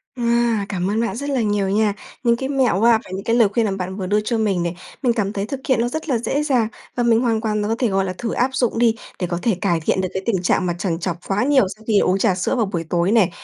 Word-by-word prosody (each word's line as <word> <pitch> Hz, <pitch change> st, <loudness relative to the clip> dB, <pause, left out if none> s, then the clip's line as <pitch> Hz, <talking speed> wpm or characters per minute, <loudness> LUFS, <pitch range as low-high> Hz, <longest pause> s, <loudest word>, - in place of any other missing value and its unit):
À, 235 Hz, -3 st, +1 dB
cảm 185 Hz, -1 st, -1 dB
ơn 215 Hz, +2 st, 0 dB
bạn 230 Hz, -, -2 dB
rất 280 Hz, +5 st, -4 dB
là 270 Hz, -3 st, +1 dB
nhiều 205 Hz, -3 st, 0 dB
nha. 210 Hz, +1 st, +2 dB, 0.3 s
Những 235 Hz, -1 st, +4 dB
cái 265 Hz, +3 st, -4 dB
mẹo 260 Hz, -9 st, +2 dB
và 230 Hz, 0 st, +5 dB
những 195 Hz, +1 st, -4 dB
cái 230 Hz, -, +1 dB
lời 235 Hz, -3 st, +5 dB
khuyên 225 Hz, +2 st, +1 dB
mà 205 Hz, -, 0 dB
bạn 190 Hz, -1 st, -4 dB
vừa 190 Hz, -2 st, -4 dB
đưa 210 Hz, +2 st, +2 dB
cho 225 Hz, +2 st, -1 dB
mình 200 Hz, -5 st, +1 dB
này. 170 Hz, 0 st, -3 dB, 0.3 s
Mình 245 Hz, -3 st, +2 dB
cảm 205 Hz, -3 st, -1 dB
thấy 200 Hz, -1 st, -2 dB
thực 270 Hz, +4 st, -5 dB
hiện 260 Hz, -4 st, +3 dB
nó 240 Hz, -, +1 dB
rất 315 Hz, +5 st, -5 dB
là 255 Hz, -, +2 dB
dễ 275 Hz, +6 st, -1 dB
dàng. 255 Hz, -7 st, +2 dB, 0.3 s
Và 245 Hz, -, 0 dB
mình 230 Hz, -1 st, +3 dB
hoàn 230 Hz, -3 st, +1 dB
toàn 215 Hz, -2 st, -1 dB
và 205 Hz, -, -1 dB
có 225 Hz, -, 0 dB
thể, 245 Hz, -, +2 dB
gọi 195 Hz, -1 st, +1 dB
là, 185 Hz, -, -3 dB
thử 230 Hz, -2 st, -3 dB
áp 250 Hz, +2 st, +1 dB
dụng 245 Hz, -4 st, 0 dB
đi 230 Hz, -2 st, +4 dB, 0.2 s
để 180 Hz, -, -1 dB
có 175 Hz, 0 st, -3 dB
thể 225 Hz, -1 st, +1 dB
cải 175 Hz, -4 st, +1 dB
thiện 175 Hz, +4 st, 0 dB
được 185 Hz, -, -1 dB
cái 190 Hz, -, -3 dB
tình 195 Hz, -6 st, 0 dB
trạng 185 Hz, 0 st, +1 dB
mà 175 Hz, -, 0 dB
trằn 175 Hz, -2 st, -2 dB
trọc 175 Hz, -1 st, -3 dB
quá 200 Hz, +3 st, +1 dB
nhiều 270 Hz, -4 st, +4 dB
sau 215 Hz, -, -19 dB
khi 210 Hz, -2 st, +4 dB
uống 185 Hz, -, +2 dB
trà 195 Hz, -2 st, +2 dB
sữa 185 Hz, +7 st, -1 dB
vào 235 Hz, -3 st, +1 dB
buổi 180 Hz, -4 st, -3 dB
tối 175 Hz, +3 st, +1 dB
nè. 220 Hz, -6 st, +4 dB
215 Hz, 310 wpm, -21 LUFS, 190-235 Hz, 0.3 s, và